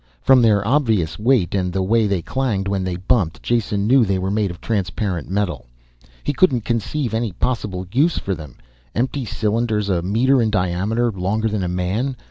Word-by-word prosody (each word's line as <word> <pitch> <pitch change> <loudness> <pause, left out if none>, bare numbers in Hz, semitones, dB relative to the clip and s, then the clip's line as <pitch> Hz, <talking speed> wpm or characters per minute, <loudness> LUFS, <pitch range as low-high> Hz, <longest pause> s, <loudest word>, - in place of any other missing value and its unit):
From 130 -2 +5
their 105 -3 +3
obvious 110 - +1
weight 115 -4 +2
and 90 -2 0
the 95 +1 -1
way 110 +3 +2
they 95 -4 -1
clanged 115 -8 -1
when 100 -1 -1
they 90 -1 -2
bumped, 90 -2 0
Jason 105 -4 0
knew 130 +3 +5
they 100 -3 0
were 95 +1 -2
made 105 -1 0
of 85 -1 -8
transparent 100 -5 -2
metal. 95 -8 -2 0.6
He 145 - -1
couldn't 130 - +2
conceive 120 +3 -2
any 110 -3 -1
possible 100 -4 -2
use 155 +7 +2
for 100 - -2
them. 75 -6 -9 0.4
Empty 130 +3 -1
cylinders 110 0 -1
a 90 -3 +1
meter 120 +8 +2
in 110 - +1
diameter, 105 +5 0
longer 100 +3 -1
than 105 -1 -2
a - - -1
man. 95 +9 -2
105 Hz, 185 wpm, -20 LUFS, 95-120 Hz, 0.6 s, From